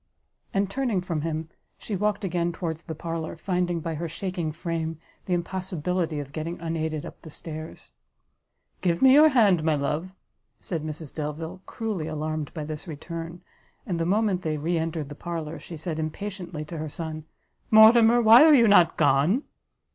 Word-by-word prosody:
And, 195 0 +1
turning 235 -1 -1
from 170 -4 -3
him, 160 0 -3 0.3
she 210 - -5
walked 210 +1 0
again 175 -2 0
towards 165 -2 -4
the 160 - -7
parlour, 165 0 -5
finding 180 -1 -1
by 165 0 -3
her 165 +2 -4
shaking 175 -1 -3
frame, 165 0 -3 0.3
the 180 - +2
impossibility 175 -2 -2
of 140 -1 -7
getting 160 +3 -5
unaided 160 -2 -3
up - - -11
the 160 - -11
stairs. 155 +1 -8 0.9
"Give 175 +1 +1
me 265 -1 +8
your 305 +2 +8
hand, 205 - +4
my 160 -1 +2
love," 150 +5 -2 0.5
said 165 -4 -4
Mrs 155 -1 -7
Delvile, 160 +4 -5
cruelly 210 -9 -3
alarmed 155 -1 -3
by 155 - -3
this 155 +4 -7
return; 165 +2 -7 0.4
and 175 -3 -2
the 165 - 0
moment 200 -1 +1
they 155 -3 -2
re 165 +4 -1
entered 160 -2 -2
the - - -7
parlour, 165 0 -5
she 165 - -9
said 160 0 -4
impatiently 175 -1 -5
to 160 +1 -7
her 155 0 -4
son, 155 0 -6 0.4
"Mortimer, 225 +2 +7
why 225 +5 +9
are 310 -1 +8
you 235 -4 +6
not 180 -5 +5
gone?" 150 - +3
165 Hz, 170 wpm, -26 LUFS, 155-185 Hz, 0.9 s, why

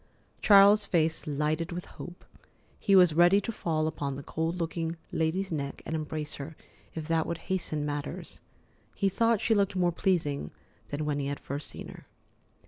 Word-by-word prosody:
Charles's 200 0 +7
face 160 -2 +1
lighted 155 +4 -1
with 175 +1 -5
hope. 175 0 -10 0.5
He 195 - +3
was 180 -4 +7
ready 175 +4 +6
to 230 - -3
fall 160 -7 -1
upon 145 -3 -2
the 140 - -7
cold 160 +4 -2
looking 165 -1 -3
lady's 175 +4 0
neck 140 -3 -4
and 160 - -3
embrace 155 -1 -3
her, 155 +3 -7 0.4
if 160 -2 -5
that 165 -1 +1
would 170 - -2 0.2
hasten 155 -5 -2
matters. 145 -1 -5 0.5
He 195 - +2
thought 230 +2 +2
she 225 - +3
looked 200 -2 +2
more 175 -1 +2
pleasing 160 - 0 0.4
than 145 +1 -3
when 145 -1 -1
he 140 - -2
had 140 0 -3
first 140 +2 -5
seen - - -8
her. - - -12
165 Hz, 175 wpm, -29 LUFS, 150-185 Hz, 0.5 s, Charles's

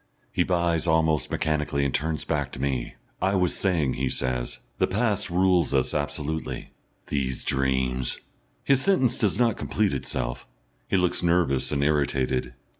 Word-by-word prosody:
He - - 0
buys 85 -2 +1
almost 80 -1 +2
mechanically, 75 -2 0
and 70 - -1
turns 80 +1 -1
back 70 -4 -1
to - - -7
me. 65 -3 -2 0.3
"I 95 +1 +2
was 90 -2 +2
saying," 85 -9 +1
he 65 0 -1
says, 65 -1 -2 0.2
"the - - +3
past 105 -1 0
rules 90 -3 +3
us 65 - +1
absolutely. 75 +2 -3 0.3
These 65 -3 -2
dreams 65 -2 0 0.2
" - - -41
His 135 -1 +3
sentence 135 -11 +2
does 105 -5 +2
not 115 -2 +2
complete 105 -5 0
itself. - - -3 0.4
He - - +2
looks 90 0 +1
nervous 85 -6 +2
and 70 -1 +1
irritated. 65 -4 0
75 Hz, 155 wpm, -26 LUFS, 65-90 Hz, 0.4 s, the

